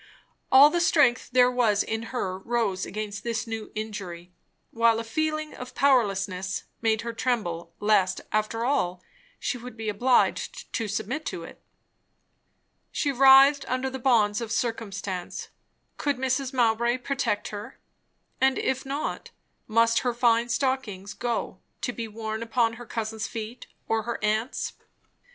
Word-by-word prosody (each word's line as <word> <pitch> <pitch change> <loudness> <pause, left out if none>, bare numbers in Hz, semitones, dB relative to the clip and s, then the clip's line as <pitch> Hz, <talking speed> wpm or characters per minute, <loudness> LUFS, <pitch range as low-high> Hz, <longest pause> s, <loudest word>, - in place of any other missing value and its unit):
All 280 +3 +9
the 345 - +1
strength 285 -7 +3
there 250 0 +5
was 225 -5 +2
in 225 +1 -3
her 190 -7 -3
rose 210 -3 -1
against 210 0 -5
this 235 0 -2
new 225 -2 -6
injury; 185 -5 -6 0.4
while 230 -1 +3
a - - -3
feeling 310 +5 -2
of 250 0 -9
powerlessness 195 -8 +1 0.2
made 220 -1 +2
her 235 0 -4
tremble 175 -9 -2
lest 205 -3 +2
after 215 +2 0
all, 180 -9 0 0.3
she 250 - -3
would 240 -1 -10
be 220 -1 -3
obliged 250 - +1
to 225 - -1
submit 220 +9 -3
to - - -4
it. - - -12 1.3
She 285 - 0
writhed 270 +2 +7
under 255 +1 -1
the 265 - -5
bonds 225 -4 +3
of 230 -1 -5
circumstance. 200 -6 -3 0.5
Could 285 -3 0
Mrs. 260 +1 0
Mowbray 235 -1 +2
protect 255 -5 -2
her? 205 0 -8 0.6
and 265 0 +4
if 265 0 -1
not, 280 +3 -3 0.4
must 230 +1 +4
her 245 -2 -1
fine 235 -1 +3
stockings 235 -6 -1
go, 240 -1 -3 0.2
to 245 - -2
be 230 -1 -5
worn 220 0 -5
upon 230 0 +1
her 235 +1 -10
cousin's 220 -1 -3
feet, 225 +2 -7 0.2
or 225 0 +1
her 235 +1 -3
aunt's? 220 +4 -1
230 Hz, 145 wpm, -26 LUFS, 215-255 Hz, 1.3 s, All